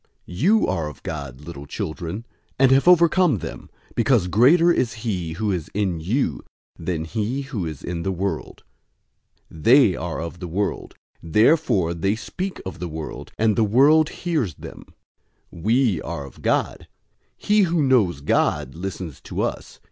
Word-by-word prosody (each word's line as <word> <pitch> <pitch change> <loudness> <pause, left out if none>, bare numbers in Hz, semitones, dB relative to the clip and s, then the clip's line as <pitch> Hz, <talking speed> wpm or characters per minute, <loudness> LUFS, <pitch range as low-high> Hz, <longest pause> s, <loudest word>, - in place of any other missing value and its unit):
004:004 90 - -9
You 210 - +4
are 80 -2 -1
of 75 - -14
God, 70 -4 -6
little 75 -2 -9
children, 85 +10 -5 0.3
and 130 0 +5
have 135 +5 +4
overcome 175 - +5
them; - - -8 0.2
because 115 -4 +2
greater 150 - +5
is 125 -8 0
he 90 -7 -2
who 105 +4 -1
is 85 -5 -3
in 95 -5 0
you 105 - -1 0.3
than 80 -1 -3
he 110 - -2
who 115 - -4
is 75 -3 -8
in 85 -1 -4
the 95 - -1
world. 95 +2 -4 0.9
004:005 80 - -11
They 120 -7 +6
are 85 0 -4
of 85 +1 -6
the 90 - -5
world. 100 +5 -3 0.3
Therefore 105 - +2
they 95 +5 0
speak 185 +11 -5
of 95 - -7
the 90 - -4
world, 80 -1 -7
and 110 -1 +2
the 115 - +3
world 145 +9 +5
hears 150 - -2
them. - - -11 0.7
004:006 85 - -11
We 115 - +2
are 70 - -5
of 70 - -14
God. - - -1 0.5
He 210 0 +2
who 165 -3 +1
knows 110 - +2
God 70 - 0
listens 90 -4 -6
to - - -4
us. - - -4
100 Hz, 165 wpm, -22 LUFS, 85-135 Hz, 0.9 s, They